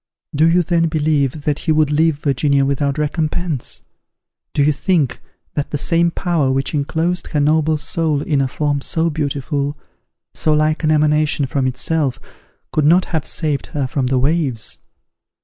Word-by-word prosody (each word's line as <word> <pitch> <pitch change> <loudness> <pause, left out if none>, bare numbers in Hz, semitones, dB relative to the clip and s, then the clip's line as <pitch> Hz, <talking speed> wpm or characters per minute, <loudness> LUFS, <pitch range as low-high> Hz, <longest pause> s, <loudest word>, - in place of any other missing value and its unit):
Do 155 +3 +4
you 175 +1 +3
then 165 0 +1
believe 150 -2 0
that 150 -1 0
he 160 - -1
would 155 -1 +3
leave 160 +1 +3
Virginia 140 -1 +1
without 140 +1 0
recompense? 155 -1 -2 0.7
Do 145 - +1
you 150 +1 +3
think 145 -5 0 0.3
that 145 - -2
the 145 - -2
same 170 +3 +2
Power 165 -6 0
which 135 +3 -1
inclosed 160 +4 -1
her 150 - -1
noble 155 +1 +2
soul 150 -1 -1
in 145 -4 +1
a 135 - +1
form 145 +1 -1
so 165 +3 0
beautiful, 145 -1 -2 0.6
so 155 - +1
like 155 +1 +1
an 155 - +2
emanation 150 -1 +2
from 130 0 -1
itself, 130 -1 -1 0.5
could 155 - +1
not 175 +4 +5
have 160 -2 -1
saved 150 -4 -2
her 140 - +1
from 130 0 -1
the 130 0 +1
waves? 135 -4 -1
150 Hz, 165 wpm, -18 LUFS, 140-160 Hz, 0.7 s, not